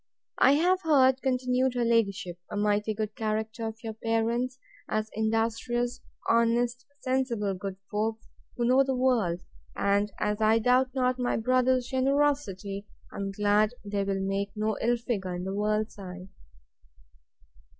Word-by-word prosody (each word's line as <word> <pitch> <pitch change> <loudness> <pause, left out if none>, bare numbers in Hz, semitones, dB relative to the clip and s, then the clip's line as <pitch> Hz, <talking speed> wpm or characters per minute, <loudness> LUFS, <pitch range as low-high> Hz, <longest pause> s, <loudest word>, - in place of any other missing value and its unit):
I 270 - +6
have 360 +5 +3
heard, 265 -5 +4
continued 255 0 +1
her 240 -1 +1
ladyship, 200 -6 0
a - - -4
mighty 210 +1 +1
good 215 0 -3
character 220 0 -2
of 225 +1 -8
your 225 -1 -4
parents, 230 +3 -1 0.3
as 215 0 -1
industrious, 230 +3 -1 0.3
honest, 235 +1 +2
sensible, 255 -6 0
good 190 +1 -5 0.2
folks, 220 +1 -2 0.3
who 240 - +1
know 255 +3 +5
the 265 -1 -1
world; 230 -9 +1 0.3
and, 200 +1 +1
as 210 0 -1
I 220 +1 +5
doubt 250 +3 +2
not 255 -1 +1
my 245 - 0
brother's 255 +1 +2
generosity, 260 -7 0 0.3
I - - -8
am 200 -1 -2
glad 210 +3 +2
they 200 -1 -1
will 195 -1 -1
make 195 +1 -1
no 215 0 0
ill 240 +1 +2
figure 200 -6 -3
in 175 - -4
the 190 +1 -3
world's 210 +1 -1
eye. 185 0 -8
225 Hz, 150 wpm, -28 LUFS, 205-250 Hz, 0.3 s, I